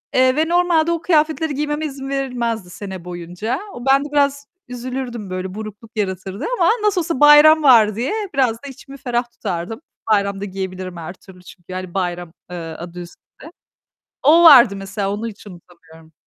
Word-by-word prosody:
Eee, 255 0 +4
ve 315 +2 +1
normalde 340 -2 +2
o 335 -1 -2
kıyafetleri 315 -2 +1
giymeme 295 +2 -2
izin 270 -2 -6
verilmezdi 240 -7 -3
sene 190 -1 -8
boyunca. 180 - -5
O 240 - -9
ben 275 +1 +3
de - - -7
biraz 280 0 +1 0.2
üzülürdüm 245 -3 -6
böyle 185 0 -5
burukluk 215 +1 -9
yaratırdı 190 - -3
ama - - +4
nasıl 410 -3 +2
olsa 330 -5 -3
bayram 295 +1 +7
var 220 -6 +6
diye 250 - -2 0.2
biraz 265 -4 +2
da - - -7
içimi 275 +1 -12
ferah 240 -2 -2
tutardım. 200 - -5 0.3
Bayramda 200 -1 +1
giyebilirim 185 -2 -6
her 170 +2 -7
türlü 185 -1 -17
çünkü 180 -1 -16
yani 185 -1 -6
bayram, 175 -3 -3 0.2
eee, 180 - -5
adı 170 +1 -8
üstünde. 175 0 -13 1.0
O 320 +5 +6
vardı 245 -10 +8
mesela 195 0 -4
onu 215 +3 -4
hiç 210 -1 -12
unutamıyorum. 165 -3 -16
225 Hz, 165 wpm, -19 LUFS, 185-280 Hz, 1.0 s, vardı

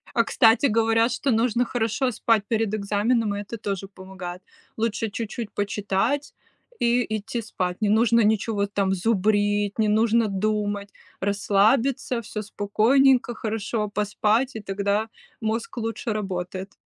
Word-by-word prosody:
А, 230 - +4
кстати, 225 +4 +4
говорят, 225 0 +2
что 270 +2 -1
нужно 235 +1 +2
хорошо 240 +2 -1
спать 225 -2 +1
перед 225 -2 0
экзаменом, 210 +2 0
и - - -3
это 205 +3 -7
тоже 200 -3 -4
помогает. 185 -2 -9 0.3
Лучше 225 0 -1
чуть-чуть 225 +1 -5
почитать 205 +7 -1 0.5
и 240 0 +2
идти 220 +3 -4
спать. 180 -4 -3
Не 215 - +1
нужно 230 +2 +4
ничего 210 -1 +1
там 200 -1 0
зубрить, 205 0 +1
не 215 -1 +2
нужно 225 +1 +3
думать. 205 0 -1 0.3
Расслабиться, 220 +6 +1
всё 215 -1 -6
спокойненько, 240 +5 +2
хорошо 215 -1 -2
поспать, 210 +5 0
и - - -4
тогда 200 +2 -1 0.3
мозг 225 +2 -3
лучше 225 +1 -3
работает. 190 -2 -4
215 Hz, 130 wpm, -24 LUFS, 205-230 Hz, 0.5 s, А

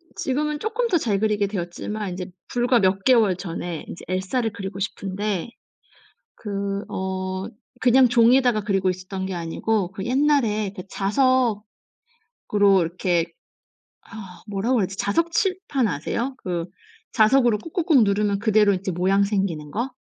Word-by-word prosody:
지금은 295 +3 -1
조금 455 +6 -1
더 370 - +2
잘 205 -4 +1
그리게 210 -1 +1
되었지만 195 +1 -4
이제 180 0 -5 0.2
불과 245 0 +2
몇 195 -1 +1
개월 225 -7 +4
전에 175 -2 -5
이제 - - -9
엘사를 195 +6 -1
그리고 195 -3 -6
싶은데 200 +1 -3 0.9
그 200 -1 -4
어 190 0 -3 0.3
그냥 255 +1 +5
종이에다가 240 -1 +4
그리고 195 -2 0
있었던 185 +1 -5
게 190 - -4
아니고 180 +3 -1
그 195 0 -6
옛날에 245 -6 +1
그 185 - -6
자석으로 225 0 0 1.0
이렇게 175 0 0 0.8
어 195 -5 -11
뭐라고 215 +5 0
해야지? 190 0 -2
자석 335 +13 0
칠판 365 - 0
아세요? 230 - -3
그 175 -2 -3 0.5
자석으로 240 -1 +4
꾹꾹꾹 325 - +2
누르면 200 0 +1
그대로 210 -1 +3
이제 190 +1 -3
모양 190 +3 +2
생기는 190 -7 -2
거. 235 - -2
205 Hz, 300 characters per minute, -23 LUFS, 190-245 Hz, 1.0 s, 그냥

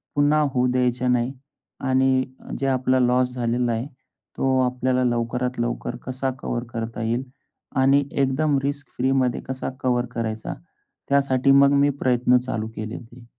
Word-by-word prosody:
पुन्हा 145 +1 +3
होऊ 125 -1 +2
द्यायच्या 125 0 +1
नाही. 125 +1 +1 0.5
आणि 130 0 +2 0.2
अ, - - -12
जे 135 - 0
आपलं 130 0 +2
लॉस 125 0 +2
झालेला 120 0 0
आहे, 115 +4 -2 0.5
तो 130 -1 +2
आपल्याला 125 0 0
लवकरात 125 +1 -1
लवकर - - -2
कसा 130 +1 -1
कव्हर 120 -3 -3
करता 115 0 -4
येईल 120 +3 0 0.6
आणि 140 +2 +4
एकदम 140 +2 +1
रिस्क 140 0 -2
फ्रीमध्ये 130 -1 +1
कसा 130 0 -3
कव्हर 125 -1 +1
करायचा, 110 -1 -3 0.6
त्यासाठी 140 -1 +3
मग 140 0 +5
मी 145 - +4
प्रयत्न 125 0 +3
चालू 115 -3 -3
केले 110 +1 -5
होते. 120 +1 -12
125 Hz, 150 wpm, -23 LUFS, 120-135 Hz, 0.6 s, मग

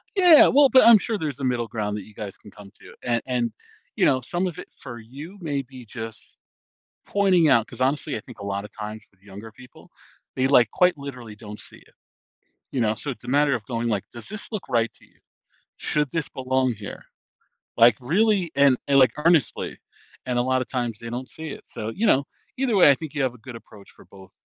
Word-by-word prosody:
Yeah, 355 -5 +8
well, 280 0 +5
but 260 -1 +6
I'm 235 -1 +9
sure 215 +2 -3
there's 150 -5 -4
a - - -6
middle 125 -3 0
ground 105 -2 -3
that 105 - -8
you 110 - -16
guys 105 -2 -7
can 105 - -16
come 100 -2 -14
to - - -15
and 120 -2 0
and 120 -3 -1 0.4
you - - +2
know, 130 - +3
some 175 +9 -2
of 175 - -5
it - - -9
for 120 -2 -9
you 140 - -11
may 145 -4 -2
be 130 -1 -12
just 110 -1 -9 0.7
pointing 185 -5 +3
out, 115 -5 +4
'cause - - -11
honestly, 140 +3 0
I - - -5
think 125 - -14
a 100 - -7
lotta 100 +1 -4
times 105 0 -8
with 95 - -34
younger 100 +3 -11
people, 125 +3 -17 0.5
they 130 - +2
like 125 -5 +4
quite 180 -1 +3
literally 130 -6 -9
don't 105 -1 -10
see - - -11
it. - - -23 0.8
You 130 - -2
know, 110 -2 +2
so 140 - -5
it's 125 - -9
a - - -10
matter 140 +1 +3
of 115 - -4
going 115 -1 -2
like, 105 -3 -1
"Does 120 - -8
this 215 +2 -6
look 210 -3 -5
right 115 -1 +1
to - - -20
you?" - - -32 0.6
"Should 150 -2 -1
this 165 -3 -3
belong 130 -1 0
here?" 100 -1 -9 0.7
Like, 115 -1 +7
really, 185 - +1
and 140 -2 +5
and 140 -1 +4
like 130 -3 +5
earnestly, 160 -3 +1 0.5
and 125 -1 -1
a - - +3
lotta 130 0 0
times 120 -4 -3
they 115 - -8
don't 125 +2 -6
see 160 0 -7
it, - - -9
so 110 - -6
you 225 - 0
know, 140 -8 +3 0.3
either 255 -5 +1
way, 175 - +7
I 140 - +6
think 155 +1 -9
you 150 - -1
have 130 -2 -1
a 125 - -15
good 120 +1 -10
approach 105 -3 -15
for - - -18
both 95 -1 -16
130 Hz, 230 wpm, -24 LUFS, 115-150 Hz, 0.8 s, I'm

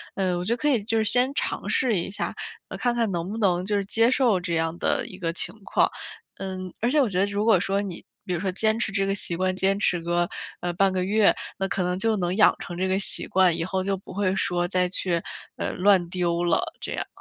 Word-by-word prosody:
呃， 185 -2 0
我 175 - -3
觉 225 - +1
得 - - -2
可 295 +3 +1
以 250 -6 +2
就 225 +2 0
是 220 - +2
先 250 +5 +2
尝 - - -1
试 245 -4 +2
一 170 - -4
下， 195 - -3 0.4
呃， - - -6
看 245 -1 0
看 230 -4 0
能 170 +1 -3
不 220 - -5
能 180 -4 +1
就 205 +1 0
是 200 - -2
接 225 +3 +3
受 245 -7 +3
这 175 -1 -4
样 165 +1 -1
的 - - 0
一 185 - -10
个 165 -3 -1
情 175 +1 +2
况。 - - +2 0.5
嗯， 185 -1 -5
而 235 - +2
且 295 +3 +4
我 255 - +1
觉 185 -2 -1
得 195 - +4
如 205 +1 -2
果 220 -5 +5
说 195 +2 0
你 190 -4 -6 0.2
比 195 - -6
如 175 - -1
说 190 -1 -1
坚 220 +4 +1
持 225 - 0
这 195 0 0
个 195 - 0
习 175 -3 0
惯， 185 0 0
坚 195 +1 +1
持 180 -3 +2
个， 175 +1 0 0.3
呃， 175 - -1
半 195 +2 +2
个 185 -1 0
月。 210 +2 +4 0.2
那 195 - -1
可 195 - -1
能 180 0 -1
就 220 +3 +1
能 180 -1 -1
养 215 - +6
成 175 - -7
这 185 +1 0
个 190 +1 +1
习 - - +1
惯， 185 -3 +3
以 165 - -1
后 185 +2 -2
就 195 - 0
不 190 - -12
会 190 0 0
说 175 -1 0
再 180 0 +1
去， 175 -1 0 0.4
呃， - - -3
乱 185 -2 +3
丢 175 -1 -1
了 170 -1 +2 0.2
这 - - -4
样。 - - -3
190 Hz, 285 characters per minute, -25 LUFS, 180-210 Hz, 0.5 s, 养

